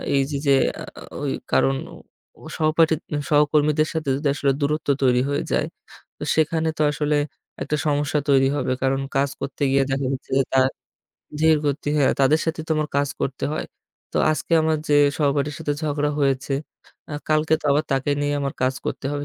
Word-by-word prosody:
এইযে 140 +1 0
যে, 140 - +6 0.3
আ - - -5 0.4
ওই - - -1 0.2
কারণ 65 0 +3 0.7
ও - - -12
সহপাঠী 160 +1 +3 0.3
সহকর্মীদের 150 +1 +3
সাথে 160 -3 -2
যদি 145 +2 -1
আসলে 140 -1 +1
দূরত্ব 150 +2 -1 0.2
তৈরি 125 -1 +4
হয়ে 145 0 -1
যায়, - - +1 0.5
তো - - -7
সেখানে 160 +1 +1
তো - - -1
আসলে 150 0 0 0.5
একটা 150 - -1
সমস্যা 145 0 +1
তৈরি 135 -1 +5
হবে। 145 - -1
কারণ 135 0 +1 0.2
কাজ 140 +1 +2
করতে 140 +1 -4
গিয়ে 135 0 +4
দেখা 135 0 0
যাচ্ছে 130 - -7
যে, 135 - +4
তার 130 0 +5 0.7
ধীরগতি, 150 -2 +2
হ্যা। 140 - +4
তাদের 145 +4 +4
সাথেই 160 -1 -2
তো - - +2
আমার 155 0 -1
কাজ 140 0 +2
করতে 135 0 -2
হয়। 155 - -3 0.5
তো - - -3 0.2
আজকে 145 +1 -4
আমার 160 0 +2
যে 145 - +4 0.2
সহপাঠীর 145 -1 +1
সাথে 155 -2 -2
ঝগড়া 150 -1 0
হয়েছে, 135 0 +1 0.6
আ - - -3
কালকে 155 +1 +3
তো - - -21
আবার 145 +2 +2
তাকে 135 +1 0
নিয়ে 145 0 0
আমার 140 -1 -2
কাজ 130 +1 +2
করতে - - -3
হবে। 145 0 -3
145 Hz, 180 wpm, -23 LUFS, 135-155 Hz, 0.7 s, যে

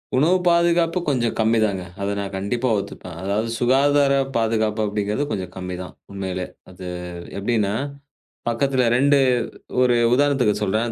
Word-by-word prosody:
உணவு 160 +8 +4
பாதுகாப்பு 170 0 +3
கொஞ்சம் 125 -5 0
கம்மிதாங்க, 110 -4 +2 0.2
அத 100 - -1
நான் 100 -1 -5
கண்டிப்பா 115 +6 -1
ஒத்துப்பன். 90 -3 -8
அதாவது 100 +4 -1
சுகாதார 140 +3 +3 0.2
பாதுகாப்பு 110 -1 +1
அப்டிங்கறது 105 +5 -1
கொஞ்சம் 90 -2 -3
கம்மிதான் 90 0 -6 0.2
உண்மையிலே. 95 -2 -4 0.2
அது 90 0 -9 0.5
எப்டின்னா, 105 -1 0 0.8
பக்கத்துல 130 +2 +1
2 140 +3 +4 0.6
ஒரு 125 -1 +4 0.2
உதாரணத்துக்குச் 130 -6 +2
சொல்றேன். 110 +4 0
115 Hz, 120 wpm, -22 LUFS, 100-135 Hz, 0.8 s, உணவு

